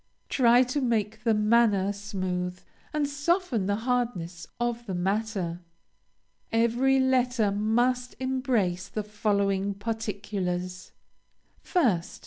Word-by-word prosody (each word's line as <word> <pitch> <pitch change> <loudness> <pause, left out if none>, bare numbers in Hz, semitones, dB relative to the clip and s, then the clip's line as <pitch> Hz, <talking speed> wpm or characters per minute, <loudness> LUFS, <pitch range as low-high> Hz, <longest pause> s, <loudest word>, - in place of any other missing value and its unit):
Try 245 -1 +5
to 255 +3 -2
make 220 -3 -1
the 225 -2 +4
manner 210 -2 +3
smooth 185 -3 -3 0.3
and 300 -1 0
soften 285 - 0
the 205 - +1
hardness 215 -10 -1
of 240 0 -2
the 190 - -3
matter. 190 -2 -1 0.9
Every 240 +4 +3
letter 250 -5 +2
must 240 +5 +1
embrace 255 -9 0
the 215 - -4
following 200 -1 0
particulars: 195 -4 -3 0.7
1st. 225 - +1
220 Hz, 105 wpm, -27 LUFS, 195-245 Hz, 0.9 s, Try